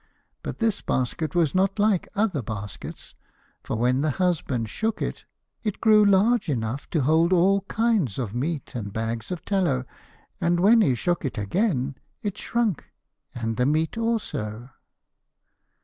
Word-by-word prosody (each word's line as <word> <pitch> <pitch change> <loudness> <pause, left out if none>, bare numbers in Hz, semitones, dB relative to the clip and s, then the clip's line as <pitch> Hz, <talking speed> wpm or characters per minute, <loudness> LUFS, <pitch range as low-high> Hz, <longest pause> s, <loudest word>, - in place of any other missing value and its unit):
But - - -5
this 225 -3 0
basket 150 +6 -1
was 165 -5 +2
not 195 +2 +2
like 205 -3 +2
other 200 - +1
baskets, 105 -3 -7 0.5
for - - -3
when 125 +3 +2
the 155 - +1
husband 145 -8 0
shook 220 - -2
it, - - -4 0.4
it 210 -3 -3
grew 215 -2 +6
large 205 +1 +3
enough 120 0 -2
to 160 - +1
hold 160 +5 +3
all 190 +2 +4
kinds 220 - +1
of 115 -6 -3
meat 145 +5 -3
and 105 -5 -4
bags 115 - -3
of 180 - -5
tallow, 170 -11 +1 0.5
and 170 0 +2
when 220 +5 +6
he 135 -11 +3
shook 175 +8 0
it 135 -4 -3
again, 135 - 0 0.2
it 205 -3 -2
shrunk 230 - -1 0.5
and 115 -2 -3
the 125 - +2
meat 155 +2 +1
also. 135 - -2
160 Hz, 150 wpm, -25 LUFS, 125-200 Hz, 0.5 s, grew